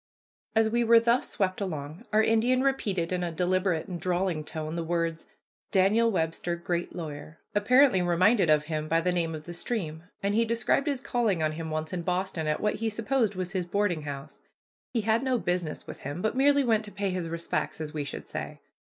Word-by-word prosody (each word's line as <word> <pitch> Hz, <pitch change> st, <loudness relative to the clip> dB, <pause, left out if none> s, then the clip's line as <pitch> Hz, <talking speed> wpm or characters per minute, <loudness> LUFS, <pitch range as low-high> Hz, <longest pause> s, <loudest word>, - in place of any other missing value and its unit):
As 225 Hz, 0 st, +4 dB
we 235 Hz, +2 st, +1 dB
were 230 Hz, 0 st, +7 dB
thus 235 Hz, +2 st, +2 dB
swept 190 Hz, -2 st, -1 dB
along, 155 Hz, -1 st, -5 dB
our 215 Hz, +1 st, +4 dB
Indian 240 Hz, +4 st, +3 dB
repeated 200 Hz, -11 st, 0 dB
in 180 Hz, -1 st, 0 dB
a 175 Hz, -, -2 dB
deliberate 180 Hz, 0 st, 0 dB
and 175 Hz, -3 st, -6 dB
drawling 180 Hz, -2 st, 0 dB
tone 155 Hz, +1 st, -5 dB
the 170 Hz, -, -2 dB
words, 165 Hz, -1 st, -2 dB, 0.4 s
"Daniel 210 Hz, +4 st, +4 dB
Webster, 165 Hz, -1 st, -1 dB
great 170 Hz, 0 st, -3 dB
lawyer," 155 Hz, -2 st, -7 dB, 0.2 s
apparently 245 Hz, 0 st, +5 dB
reminded 180 Hz, +2 st, +3 dB
of 150 Hz, -1 st, +4 dB
him 155 Hz, -1 st, -3 dB
by 165 Hz, +1 st, +3 dB
the 180 Hz, +2 st, +1 dB
name 165 Hz, -2 st, -1 dB
of 155 Hz, 0 st, -9 dB
the 175 Hz, -, -7 dB
stream, 170 Hz, -5 st, -3 dB, 0.2 s
and 200 Hz, +1 st, +1 dB
he 230 Hz, +2 st, +4 dB
described 230 Hz, +5 st, +1 dB
his 280 Hz, -3 st, 0 dB
calling 225 Hz, -, 0 dB
on 155 Hz, -, +1 dB
him 160 Hz, +1 st, -5 dB
once 155 Hz, +1 st, -3 dB
in 180 Hz, -, -2 dB
Boston 180 Hz, -2 st, -1 dB
at 150 Hz, -, 0 dB
what 210 Hz, -, 0 dB
he 225 Hz, +1 st, -1 dB
supposed 225 Hz, -1 st, 0 dB
was 185 Hz, 0 st, -3 dB
his 185 Hz, -3 st, -2 dB
boarding 185 Hz, -3 st, 0 dB
house. 145 Hz, 0 st, -7 dB, 0.5 s
He 230 Hz, -, 0 dB
had 220 Hz, +2 st, +2 dB
no 260 Hz, -2 st, +1 dB
business 175 Hz, -6 st, -2 dB
with -, -, -9 dB
him 145 Hz, +6 st, -5 dB
but 220 Hz, -, +1 dB
merely 280 Hz, +1 st, +4 dB
went 225 Hz, -3 st, +2 dB
to 205 Hz, -, -8 dB
pay 200 Hz, -1 st, -2 dB
his 180 Hz, -2 st, -3 dB
respects, 170 Hz, -1 st, -2 dB
as 155 Hz, -1 st, -4 dB
we 150 Hz, -2 st, -2 dB
should 140 Hz, -, -7 dB
say. -, -, -6 dB
180 Hz, 210 wpm, -28 LUFS, 165-220 Hz, 0.5 s, were